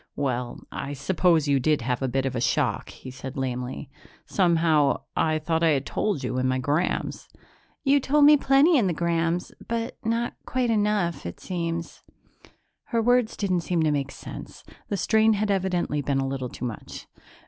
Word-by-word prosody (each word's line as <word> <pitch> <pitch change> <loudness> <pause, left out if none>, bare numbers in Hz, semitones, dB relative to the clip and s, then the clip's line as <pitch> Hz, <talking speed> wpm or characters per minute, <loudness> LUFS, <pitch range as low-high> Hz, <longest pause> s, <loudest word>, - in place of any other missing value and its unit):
"Well, 125 -3 -2
I 140 - -5
suppose 160 +1 +2
you 140 -1 +3
did 150 0 +1
have 125 +1 -1
a 135 - 0
bit 135 +1 -1
of 130 - -2
a 120 - -1
shock," - - 0
he 130 - -10
said 130 +1 -8
lamely. 130 +1 -4 0.3
"Somehow, 165 -6 +2
I 155 -1 +2
thought 160 +1 -1
I 165 -2 +4
had 135 - -5
told 200 -11 -1
you 125 0 -2
in 130 - +1
my 130 0 +1
'grams." 145 +7 -1 0.5
"You 280 0 +4
told 285 +2 +3
me 300 +1 +9
plenty 280 +3 +4
in 210 - +2
the 175 - 0
'grams, 170 +1 0 0.2
but 230 +1 -3
not 230 +1 -1
quite 250 -2 0
enough, 205 - 0
it 85 - -8
seems." 170 -2 -4 0.8
Her 235 - -1
words 245 0 +2
didn't 185 -4 0
seem 170 -1 0
to 155 - +2
make 140 -2 -1
sense; - - -10 0.3
the 200 - -1
strain 220 +4 +3
had 210 0 0
evidently 180 -6 0
been 140 -1 -1
a 135 - -1
little 135 -2 -3
too 125 - -6
much. 115 -3 -7
165 Hz, 180 wpm, -25 LUFS, 135-210 Hz, 0.8 s, me